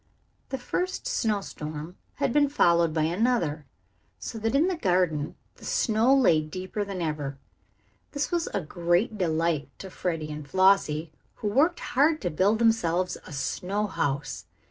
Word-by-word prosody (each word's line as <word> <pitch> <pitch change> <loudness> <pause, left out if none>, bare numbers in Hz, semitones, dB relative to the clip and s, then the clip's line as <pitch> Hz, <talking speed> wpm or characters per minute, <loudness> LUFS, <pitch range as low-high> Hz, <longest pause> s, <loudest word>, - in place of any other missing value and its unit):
The 265 - -2
first 360 - -3
snow 225 - 0
storm 155 0 -7 0.2
had - - 0
been 290 -1 +4
followed 170 - +3
by 155 0 0
another, 170 - 0 0.5
so 225 - -6
that 225 +4 0
in 305 +6 +4
the 375 - 0
garden 180 - 0 0.2
the - - -17
snow 225 +2 +2
lay 170 - +4
deeper 185 +6 -4
than 195 -3 -4
ever. 145 -3 -3 0.8
This 285 0 -2
was 345 -1 0
a 200 - -2
great 175 +6 0
delight 165 -3 0
to 190 - -9
Freddie 165 -5 -3
and 150 -1 -7
Flossie, 185 -4 +3 0.2
who 210 - -3
worked 300 - +2
hard 305 +4 +4
to 175 - -1
build 195 +8 +2
themselves 185 -6 +2
a - - -10
snow 185 +8 -2
house. 145 -7 -2
185 Hz, 155 wpm, -27 LUFS, 155-225 Hz, 0.8 s, been